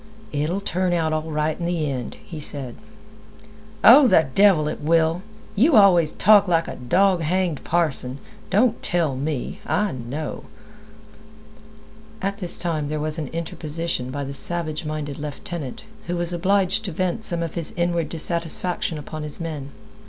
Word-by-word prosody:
"It'll 155 +7 -1
turn 185 -2 0
out 160 -2 +1
all 155 +1 -2
right 155 0 -1
in 170 - -2
th' 175 0 -1
end," 135 -6 -3
he 160 - -8
said. 140 -4 -6 1.1
"Oh, 260 +4 +9
the 160 -8 +5
devil 195 -7 +5
it - - -4
will! 165 +2 +2 0.3
You 265 +8 +4
always 180 -7 +6
talk 205 0 +5
like 165 -2 +2
a - - -5
dog 180 +8 +2
hanged 175 -1 -1
parson. 145 -6 0 0.3
Don't 215 +5 +2
tell 165 -6 0
me! 140 0 -3
I 210 -1 0
know—" 130 +5 -5 1.7
At 200 +1 -3
this 180 -3 0
time 160 -4 -2
there 155 +1 -3
was 155 +1 -1
an 150 - -3
interposition 165 -3 -4
by 140 +2 -4
the 140 0 -5
savage 155 +2 -1
minded 150 -2 -4
lieutenant, 150 -1 -6 0.2
who 175 - -1
was 175 0 -1
obliged 195 +4 +1
to 190 - -3
vent 185 +5 -2
some 170 -4 -1
of 165 - -4
his 170 -3 -4
inward 170 -2 0
dissatisfaction 170 0 -1
upon 155 +1 -7
his 150 -1 -6
men. 155 -5 -5
165 Hz, 160 wpm, -23 LUFS, 150-180 Hz, 1.7 s, Oh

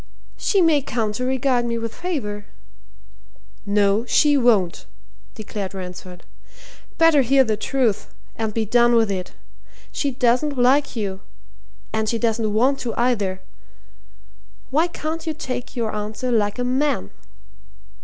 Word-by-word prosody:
"She 395 - +1
may 310 -3 +4
come 225 -5 -2
to 250 - -3
regard 260 -1 +1
me 235 -1 -2
with 230 -1 -4
favour." 210 - -4 1.2
"No, 205 +1 +2
she 295 -1 +4
won't!" 215 - +2 0.5
declared 205 -3 -6
Ransford. 180 -1 -8 0.7
"Better 330 -3 +5
hear 265 +2 +4
the 220 -3 0
truth, 230 -1 -1 0.2
and 220 -1 -2
be 220 +1 -1
done 240 +2 +4
with 225 -3 +3
it. 185 -2 -4 0.6
She 285 - -1
doesn't 255 +2 +1
like 260 +4 +3
you 195 -4 -3 0.7
and 220 -1 0
she 230 - 0
doesn't 225 -2 0
want 260 +6 +2
to, 235 -2 -4
either. 205 -6 0 1.3
Why 315 +5 +3
can't 325 -1 -5
you 315 - -1
take 260 -4 -5
your 230 -3 -2
answer 215 +4 -3
like 210 -2 +1
a 250 - -1
man?" 265 +4 0
235 Hz, 135 wpm, -22 LUFS, 210-270 Hz, 1.3 s, Better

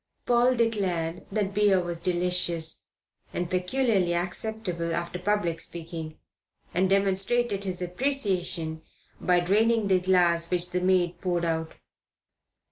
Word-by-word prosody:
Paul 245 +1 +4
declared 185 -7 0
that 200 -1 -1
beer 205 -2 +4
was 175 -1 -3
delicious 175 -2 0 0.6
and 175 0 -2
peculiarly 185 -1 +1
acceptable 180 -2 -2
after 170 +1 -3
public 180 -3 0
speaking, 165 -2 -7 0.6
and 185 +2 +2
demonstrated 200 +2 +1
his 185 -1 -3
appreciation 180 - -1 0.4
by 180 -1 +3
draining 215 +3 +2
the 185 -1 +4
glass 175 -2 +3
which 180 -1 -1
the 180 0 0
maid 180 -2 +1
poured 175 -2 0
out. 160 -1 -2
180 Hz, 120 wpm, -27 LUFS, 170-200 Hz, 0.6 s, Paul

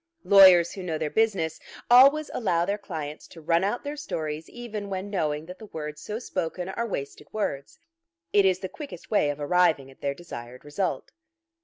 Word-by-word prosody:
Lawyers 185 -4 +7
who 195 - -7
know 170 -4 -3
their 155 -1 -3
business 195 -8 +1 0.3
always 275 +5 +6
allow 175 -7 +1
their 200 +2 0
clients 155 -6 -6
to 165 - -13
run 165 +2 +1
out 205 +5 -1
their 290 +1 -4
stories 155 - -5
even 220 -4 -6
when 195 +1 -4
knowing 155 -5 -1
that 180 +2 -10
the 215 - -10
words 150 -3 -7
so 210 +5 -4
spoken 180 -5 -4
are 235 +4 -3
wasted 140 -9 -6
words. 140 - -3 0.6
It 205 - +6
is 185 -1 +2
the 190 - -3
quickest 285 - -10
way 205 -9 +3
of 145 0 -4
arriving 150 -3 +2
at 135 - -21
their 140 0 -1
desired 125 -7 -10
result. 155 +6 -3
180 Hz, 185 wpm, -26 LUFS, 155-205 Hz, 0.6 s, Lawyers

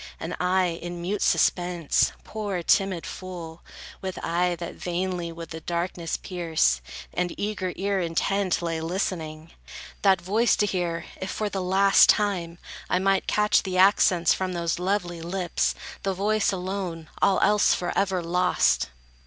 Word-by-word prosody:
And - - -4
I, 180 -2 +1
in 175 0 -6
mute 195 +4 -2
suspense, 175 -3 +2
poor 205 -5 -4
timid 190 -1 +2
fool, 170 -3 -8 0.4
With 190 -1 -5
eye 175 +1 +1
that 170 0 -6
vainly 175 -1 -3
would 165 0 -8
the 160 - -5
darkness 170 0 -2
pierce, 160 - 0 0.3
And 180 -1 -2
eager 200 -3 -2
ear 195 +1 0
intent, 180 +2 0
lay, 165 -1 -2
listening, 165 -2 -3 0.5
That 195 -2 +4
voice 215 +6 +2
to 210 - +2
hear, 175 -4 -2 0.2
if, 190 - -3
for 215 +2 -2
the 195 -1 -3
last 195 +2 +5
time, 180 -5 +1 0.3
I - - +2
Might 195 +1 +1
catch 210 0 +3
the 185 -2 -3
accents 185 -2 +5
from 185 -1 -2
those 170 0 -1
lovely 180 -2 -1
lips; 175 0 -1 0.3
The 195 -1 -1
voice 210 +2 +1
alone; 180 -3 -4
all 195 - +4
else 210 0 +4
forever 185 0 -1
lost! 170 - +2
180 Hz, 145 wpm, -25 LUFS, 170-195 Hz, 0.5 s, last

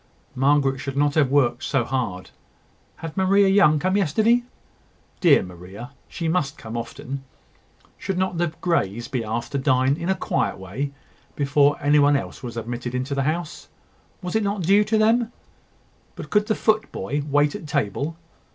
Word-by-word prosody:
Margaret 135 0 +2
should 140 0 -5
not 145 0 +2
have 145 -4 +3
worked 130 -3 +2
so 135 -4 0
hard. 115 -9 -3 0.6
Had 165 -1 -8
Maria 195 +1 +4
Young 190 -6 +5
come 185 +5 0
yesterday? 215 +6 +3 0.8
Dear 160 - +5
Maria! 95 +7 -10 0.2
she 165 - -4
must 160 -5 -1
often 115 +2 -6
come. 135 +1 -5 0.8
Should 195 -2 -3
not 185 -2 -1
the 175 - +2
Greys 120 - 0
be 130 -4 -2
asked 115 +2 -4
to 140 - -1
dine 130 0 +2
in 170 +2 -4
a 190 - +3
quiet 135 -8 -1
way, 105 +10 -4 0.4
before 145 0 +3
any 145 +1 +3
one 145 0 +5
else 140 - -4
was 120 -2 -7
admitted 120 +2 -4
into 130 +3 -2
the 140 - 0
house? 160 +5 -3 0.6
Was 180 +2 -4
it 220 - +3
not 200 -2 -1
due 200 +5 +5
to 220 +1 +1
them? 225 +2 +3 0.8
But - - -9
could 210 0 +2
the 215 - +1
footboy 150 - 0
wait 145 +1 +3
at 155 - -7
table? 140 +3 -2
145 Hz, 170 wpm, -23 LUFS, 130-180 Hz, 0.8 s, Young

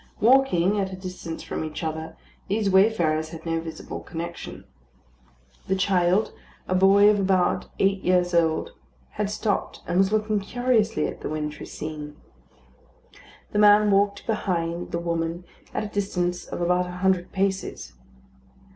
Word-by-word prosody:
Walking 210 -6 +4
at 190 -1 -1
a - - -5
distance 185 -3 -7
from - - -4
each 155 +1 -6
other, 160 0 -4 0.3
these 205 0 0
wayfarers 170 -6 +3
had 165 0 -10
no 165 0 0
visible 165 0 -7
connection. 170 +1 -7 1.0
The 190 - +1
child, 185 +1 +2 0.3
a - - 0
boy 195 +2 +6
of 210 -1 +4
about 190 -2 +1
eight 195 0 +2
years 180 -1 +2
old, 165 -2 +1 0.4
had 210 -1 -2
stopped, 210 0 -2
and 175 +2 +1
was 195 +1 +3
looking 215 -1 +1
curiously 225 +1 +1
at - - -5
the - - -4
wintry 150 0 -4
scene. 150 -1 -7 1.4
The 205 - 0
man 210 0 +6
walked 200 +1 +2
behind 175 -5 -2
the - - -1
woman, 170 0 -2 0.3
at - - -2
a - - -3
distance 180 -3 -2
of - - -5
about 180 +1 +2
a - - -6
hundred 185 -2 +2
paces. 190 - -2
185 Hz, 145 wpm, -25 LUFS, 170-205 Hz, 1.4 s, boy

